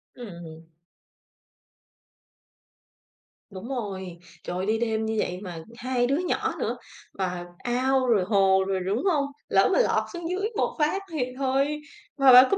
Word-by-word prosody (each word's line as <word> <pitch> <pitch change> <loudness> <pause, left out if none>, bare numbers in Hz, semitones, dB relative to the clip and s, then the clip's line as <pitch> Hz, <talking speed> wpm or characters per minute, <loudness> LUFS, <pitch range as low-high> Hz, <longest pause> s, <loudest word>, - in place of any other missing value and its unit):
Ừm. 170 -8 -9 2.9
Đúng 195 +3 -8
rồi. 190 -8 -5 0.2
Trời 180 - -4
ơi, 190 - -1
đi 220 +1 +1
đêm 220 -1 0
như 220 0 -1
vậy 180 -2 -1
mà 175 -5 -7
hai 245 0 0
đứa 275 +3 +2
nhỏ 360 0 -1
nữa, - - -1 0.4
và 180 -2 -3 0.2
ao 255 +1 +1
rồi 210 -6 +4
hồ 190 -1 +4
rồi 190 -1 0
đúng 205 - 0
hông? 310 -7 +3 0.2
Lỡ - - +4
mà - - +4
lọt - - +3
xuống 345 -1 -5
dưới 395 +4 -1
một - - 0
phát 310 +6 +2
thì 295 -6 0
thôi. 275 +3 +1 0.4
Mà 270 -2 +7
bạn 250 +1 +11
có 395 - +3
235 Hz, 160 wpm, -26 LUFS, 190-275 Hz, 2.9 s, bạn